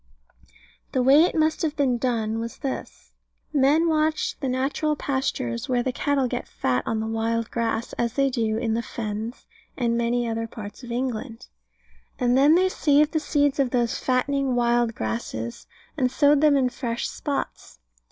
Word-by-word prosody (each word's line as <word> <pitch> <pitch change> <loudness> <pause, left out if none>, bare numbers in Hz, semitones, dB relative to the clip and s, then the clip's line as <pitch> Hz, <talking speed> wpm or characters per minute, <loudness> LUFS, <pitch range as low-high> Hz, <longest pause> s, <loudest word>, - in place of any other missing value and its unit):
The 260 -2 +2
way 280 +6 +7
it - - -2
must 315 0 +1
have 310 -3 -1
been 260 -5 +1
done 225 -3 -1
was 230 0 -5
this. 275 -3 -6 0.4
Men 295 +4 +4
watched 310 -1 0
the 270 - -1
natural 275 +4 0
pastures 265 - -2
where 245 -1 +1
cattle 270 +1 0
get 245 0 -4
fat 125 -1 -1
on 225 -1 0
the 220 - -2
wild 225 +1 -1
grass, 230 0 -2
as 235 -1 0
they 275 -1 +2
do 225 -3 0
in 225 -1 -1
the 230 - 0
Fens, 220 +1 -5 0.3
and 235 -2 +1
many 235 0 0
other 225 0 -2
parts 210 -1 -9
of 240 -2 -9
England. 245 -1 -4 0.7
And 245 -1 +2
then 285 +4 +6
they 370 +2 +4
saved 300 -4 +3
the 315 - +1
seeds 290 -1 +1
of 270 -2 +2
those 240 -2 0
fattening 265 0 0
wild 240 -1 +2
grasses, 110 +1 -4 0.3
and 260 -4 +1
sowed 290 +1 +4
them 300 -2 +5
in 255 -2 +2
fresh 235 -2 -3
spots. 285 -2 -5
250 Hz, 170 wpm, -24 LUFS, 230-285 Hz, 0.7 s, way